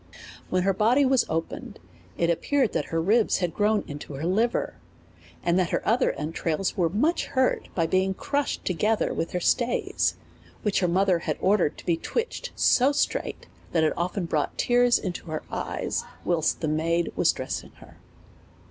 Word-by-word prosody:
When 185 0 +1
the 195 - +3
body 235 +8 +3
was 265 -1 +3
opened, 165 +1 -4 0.4
it 170 0 +2
appeared 260 - +1
that - - 0
her 165 - -2
ribs 215 +7 +3
had 175 -3 -1
grown 210 0 +2
into 145 0 -8
her 145 +4 -4
liver, 220 +7 0 0.7
and 175 +2 +2
that 180 -2 +1
her - - -2
other 230 +4 +3
en 150 +3 -4
trails 165 +3 -1
were 170 -3 +2
much 290 - +1
hurt 260 -1 0
by 165 - +2
being 190 +3 +1
crushed 285 +6 -2
together 210 +5 +1
with 165 - -3
her 180 - 0
stays, 240 +7 +1 0.5
which 210 -2 +1
her 180 - +1
mother 185 0 +2
had - - -3
ordered 185 -5 +2
to - - -12
be 170 -2 +2
twitch 475 - -3
ed - - -20
so 260 +3 +4
straight, 290 - -1 0.3
that 165 -2 +3
it 155 - +2
often 180 +2 -2
brought 155 -3 -1
tears 245 0 +4
into 180 -2 -5
her 155 -1 -4
eyes - - -2 0.2
whilst 165 -3 +1
the 160 - 0
maid 165 +3 0
was - - +4
dressing - - -5
her. - - -17
185 Hz, 180 wpm, -26 LUFS, 165-225 Hz, 0.7 s, so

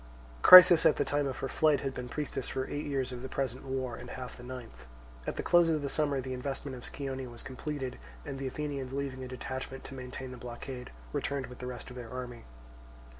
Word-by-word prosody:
Chrysis 180 -2 +11
at - - +4
the - - 0
time 145 -1 +1
of 130 - -4
her 135 - -2
flight 150 +1 +3
had 135 -1 -2
been 125 -1 -6
priestess 135 -2 -3
for 130 0 -2
eight 145 +1 -4
years 135 -3 -1
of 125 -1 -6
the 130 - -6
present 130 -1 -2
war 130 -3 -3
and 125 - -9
half 125 0 -7
the - - -12
ninth. 125 - -9 0.4
At - - -2
the - - -3
close 175 -1 +5
of 155 -2 +1
the 140 - -1
summer 145 -2 +1
the 130 0 -4
investment 135 +1 -4
of 125 - -9
Scione 135 -2 -4
was 120 -1 -9
completed, 135 - -5 0.3
and 135 - -5
the 135 - -2
Athenians, 140 -1 -4
leaving 135 -2 -3
a - - -5
detachment 130 +1 -5
to - - -8
maintain 130 0 -6
the 125 - -8
blockade, 125 +1 -7 0.2
returned 140 -2 -1
with 125 - -11
the 125 - -5
rest 125 0 -7
of 125 - -9
their 120 -2 -7
army. 125 -1 -7
130 Hz, 225 wpm, -31 LUFS, 125-140 Hz, 0.4 s, Chrysis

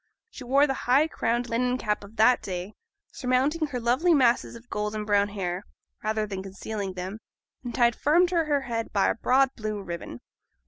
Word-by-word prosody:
She 270 - -9
wore 275 +4 +4
the 270 - 0 0.2
high 280 +5 +5
crowned 240 -5 -1
linen 250 +2 0
cap 210 -4 -2
of 200 +2 -13
that 230 +3 +4
day, 185 +2 -5 0.4
surmounting 275 +5 0
her 260 -4 -4
lovely 260 +9 +3
masses 250 -4 +2
of 235 +1 -13
golden 210 -1 -3
brown 205 -1 +3
hair, 185 -2 -3 0.4
rather 215 0 0
than 195 -2 -5
concealing 195 +1 -5
them, 185 +4 -6 0.4
and 240 -2 -5
tied 240 -1 +3
firm 335 +5 +4
to 340 -3 +1
her 290 -2 +1
head 230 -3 -4
by 200 - +2
a - - +2
broad 260 +3 +3
blue 215 -2 -4
ribbon. 170 -10 -7
230 Hz, 185 wpm, -26 LUFS, 205-260 Hz, 0.4 s, high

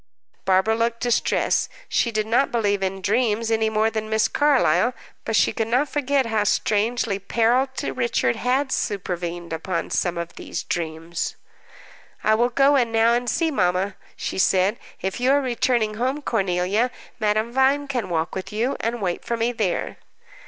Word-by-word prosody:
Barbara 190 +3 +3
looked 230 +1 -1
distressed. 240 -1 +1 0.2
She 235 - +1
did 215 -1 0
not 235 +5 +2
believe 205 -4 +1
in 190 0 -3
dreams 225 +1 +1
any 220 0 +2
more 220 +1 +1
than 220 -1 -3
Miss 220 0 +2
Carlyle, 250 - +2 0.3
but 225 - -1
she - - +3
could 225 - -1
not 255 +5 +1
forget 280 -1 +1
how 220 -2 +1
strangely 215 0 0
peril 235 +6 +2
to - - -3
Richard 235 - 0
had 265 +2 0
supervened 175 -5 -3
upon 170 +2 -3
some 175 -2 0
of 170 0 -6
these - - -5
dreams. 165 0 -3 0.9
"I 215 - +4
will 240 +3 +3
go 275 +3 +4
in 240 -4 +2
now 225 +1 +4
and 240 0 0
see 325 +7 +1
mamma," 185 -4 0 0.2
she - - -4
said. 190 +3 +2 0.2
"If 190 +5 -2
you 250 +1 +2
are 285 - +4
returning 240 -4 0
home, 260 +6 -2
Cornelia, 195 +2 +1 0.3
Madame 215 +2 0
Vine 270 +2 +2
can 250 -7 -2
walk 165 -1 -1
with 190 - -5
you, 235 +6 -1
and 230 -1 -2
wait 175 -2 -2
for 235 - -2
me 230 +1 +1
there." 215 -7 -2
225 Hz, 170 wpm, -23 LUFS, 190-245 Hz, 0.9 s, I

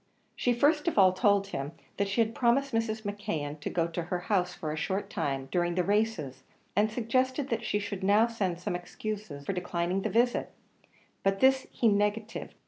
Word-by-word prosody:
She 245 - +1
first 295 +6 +3
of 340 - 0
all 190 -2 +7
told 200 0 +3
him 140 -2 -4 0.2
that 200 - +1
she 195 +4 +1
had 225 0 +1
promised 260 +3 +2
Mrs. 225 -1 -1
McKeon 160 -8 -3
to - - -4
go 170 -2 +1
to 170 +1 -3
her 175 +1 -3
house 180 -3 +2
for 155 -3 -5
a - - -2
short 195 +6 -2
time, 135 -7 -2
during 175 -1 +1
the 180 - +2
races, 195 - 0 0.3
and 210 +1 +3
suggested 255 +4 0
that 230 0 -1
she 215 - 0
should 205 -1 -4
now 205 +3 +5
send 195 -7 -2
some 175 - -2
excuse 210 +4 -5
for 140 +4 -5
declining 180 +1 -1
the - - -1
visit; 240 +2 +2 0.7
but 195 0 +1
this 265 0 +4
he 235 - +1
negatived. 210 +2 0
205 Hz, 195 wpm, -29 LUFS, 175-225 Hz, 0.7 s, all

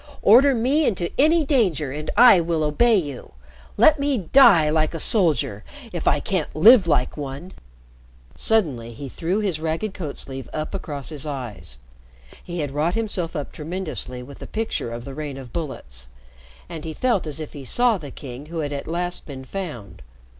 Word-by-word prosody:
Order 260 +6 +6
me 270 +6 +2
into 175 -5 -1
any 315 +2 +4
danger 185 - +1
and 150 +2 -5
I 235 -6 +8
will 165 -1 -1
obey 220 +11 +3
you. 145 - -5 0.4
Let 310 -1 +5
me 280 -1 +1
die 195 - +6
like 155 +1 +1
a - - -4
soldier 150 - +2 0.3
if 175 - -4
I 145 - +4
can't 180 0 -3
live 210 +4 +7
like 130 -4 +1
one.'" 145 +5 -7 0.8
Suddenly 140 - 0
he 140 +5 -8
threw 175 - -2
his 190 -7 -1
ragged 165 +6 -2
coat 160 -8 -6
sleeve 135 -2 -6
up 155 +4 -4
across 145 -8 -5
his 150 -1 -4
eyes. 120 - -5 0.7
He 175 -2 -5
had 145 -2 -3
wrought 155 +5 0
himself 200 -7 -2
up 145 -2 -4
tremendously 155 -6 -5
with 140 +2 -12
the - - -8
picture 220 - -3
of 115 +1 -7
the 135 - -7
rain 145 -1 -6
of 130 -3 -10
bullets. 90 - -6 0.6
And 155 - -8
he 160 - -5
felt 220 -4 0
as 155 0 -4
if 155 - -7
he 145 - -8
saw 235 - +2
the 145 -3 -8
King 135 +1 -9
who 165 0 -4
had 145 -1 -3
at 140 - -5
last 175 +2 -3
been 135 -3 -8
found. 125 - -7
160 Hz, 180 wpm, -23 LUFS, 140-195 Hz, 0.8 s, I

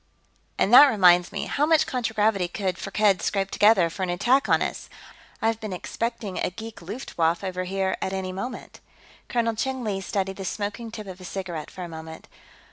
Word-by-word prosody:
"And 210 - +2
that 290 +4 +11
reminds 180 -6 +5
me - - -3
how 295 +2 0
much 320 -1 +4
contragravity 220 -6 0
could 185 0 -3
Firkked 200 -2 +2
scrape 195 -1 -1
together, 205 -5 +5
for 165 +4 -8
an 185 - -1
attack 245 +10 +2
on - - +4
us? - - -5 0.5
I've 225 0 +1
been 215 -4 -5
expecting 225 +1 -4
a - - 0
geek 220 +4 -9
Luftwaffe 170 -4 -2
over 185 -1 -3
here, 190 0 -1
at 190 - -2
any 190 -1 -3
moment." 235 +6 -7 0.5
Colonel 230 -2 +1
Cheng 260 +3 -2
Li 200 -3 -2
studied 195 -1 -2
the 195 - -6
smoking 210 +4 -4
tip 220 -1 -8
of 190 -1 -9
his 185 - -9
cigarette 175 -6 -5
for 185 - -8
a - - -5
moment. 160 -1 -9
195 Hz, 190 wpm, -25 LUFS, 185-225 Hz, 0.5 s, that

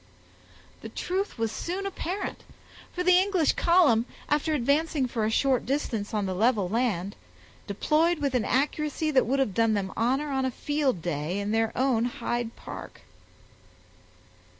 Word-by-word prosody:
The - - -7
truth 385 -1 -3
was 225 -1 -1
soon 370 +9 -4
apparent; 390 0 -4 0.5
for 360 - -3
the 365 0 +6
English 375 -5 +2
column, 300 -10 +4 0.2
after 300 +1 +1
advancing 290 +2 +1
for 230 -3 -2
a - - +1
short 260 +2 +2
distance 240 -6 -2
on 210 -3 -1
the 190 - -2
level 215 0 +2
land, 205 -3 -1 0.5
deployed 310 - +2
with 285 -3 -1
an 250 -3 +1
accuracy 300 +5 0
that 260 -5 +3
would 270 +3 +1
have 265 -8 +1
done 225 0 +2
them 195 -2 -2
honor 265 +6 0
on 265 -1 0
a 260 - +1
field 270 - -1
day 165 +2 -2
in 205 +1 -2
their 225 0 +1
own 250 -3 +2
Hyde 240 -1 -3
Park. - - -9
255 Hz, 155 wpm, -27 LUFS, 220-305 Hz, 0.5 s, the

